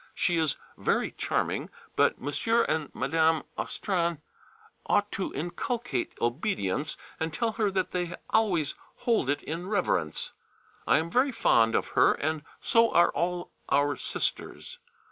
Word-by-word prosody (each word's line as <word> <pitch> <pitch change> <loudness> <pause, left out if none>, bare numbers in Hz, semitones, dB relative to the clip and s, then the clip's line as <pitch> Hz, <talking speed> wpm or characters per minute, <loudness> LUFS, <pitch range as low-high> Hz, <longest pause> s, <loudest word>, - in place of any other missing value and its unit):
She 175 -2 +1
is 160 -3 +2 0.2
very - - +1
charming, - - -1 0.3
but - - +4
M. 140 - -5 0.4
and 155 -2 -1
Mme. 160 +4 +2
Austrain 170 -4 -1 0.7
ought 205 0 +2
to 190 - -2
inculcate 175 - -2
obedience, 140 - -1 0.2
and 160 0 -1
tell 230 +7 0
her 215 -2 +1
that 190 -1 -1
they 175 -1 -2 0.2
always 180 -10 +2 0.3
hold 225 - +2
it 145 - 0
in 170 +4 -4
reverence. 190 - 0 0.5
I - - +5
am 165 +2 -2
very 260 +6 +3
fond 115 - +3
of - - 0
her - - +5
and 155 +1 -2 0.2
so 230 0 +4
are 170 - +5
all 175 0 -2 0.2
our 145 +1 +3
Sisters. - - -3
170 Hz, 140 wpm, -28 LUFS, 150-200 Hz, 0.7 s, I